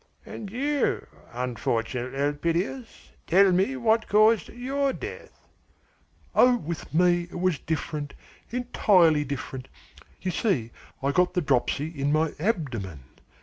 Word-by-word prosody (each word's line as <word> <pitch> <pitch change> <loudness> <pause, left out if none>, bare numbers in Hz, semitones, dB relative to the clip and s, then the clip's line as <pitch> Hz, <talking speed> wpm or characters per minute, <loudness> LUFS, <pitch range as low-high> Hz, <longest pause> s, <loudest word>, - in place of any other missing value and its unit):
And 205 - -7
you, 280 +6 0 0.3
unfortunate 125 +1 -2
Elpidias, 170 - -2 0.2
tell 190 +2 +5
me 190 +9 +2
what 230 -3 +2
caused 215 -1 +4
your 270 +3 -1
death?" - - -9 0.9
"Oh, 250 0 +5
with 170 -6 -6
me, 175 +1 +3
it 175 - -7
was 185 -4 +1
different, 150 -2 -4 0.3
entirely 190 -10 +3
different! 135 -1 -6 0.5
You 185 - -2
see 160 - 0 0.3
I 140 - +2
got 180 +5 +2
the 180 - +2
dropsy 140 +1 +1
in 145 -3 -2
my 155 0 +1
abdomen. 125 - -2
170 Hz, 120 wpm, -26 LUFS, 140-215 Hz, 0.9 s, tell